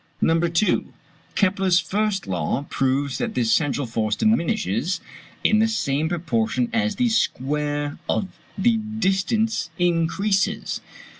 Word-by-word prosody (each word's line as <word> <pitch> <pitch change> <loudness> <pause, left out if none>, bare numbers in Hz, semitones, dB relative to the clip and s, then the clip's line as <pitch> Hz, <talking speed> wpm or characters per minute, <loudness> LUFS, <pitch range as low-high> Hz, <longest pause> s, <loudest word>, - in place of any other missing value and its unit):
No. 165 0 +3
2. 170 +4 +1 0.4
Kepler's 190 -2 +3
first 205 0 -1
law 95 +9 -2
proves 135 0 0
that - - -2
this 120 -3 +1
central 145 -2 +1
force 110 -2 -1
diminishes 170 - +1 0.4
in 215 - +4
the 220 - +4
same 160 -8 0
proportion 125 -8 0
as 225 -2 +1
the 245 +4 +2
square 145 - -1
of 195 - 0 0.3
the 225 +4 +3
distance 215 -1 0
increases. 175 +4 0
175 Hz, 120 wpm, -23 LUFS, 140-210 Hz, 0.4 s, in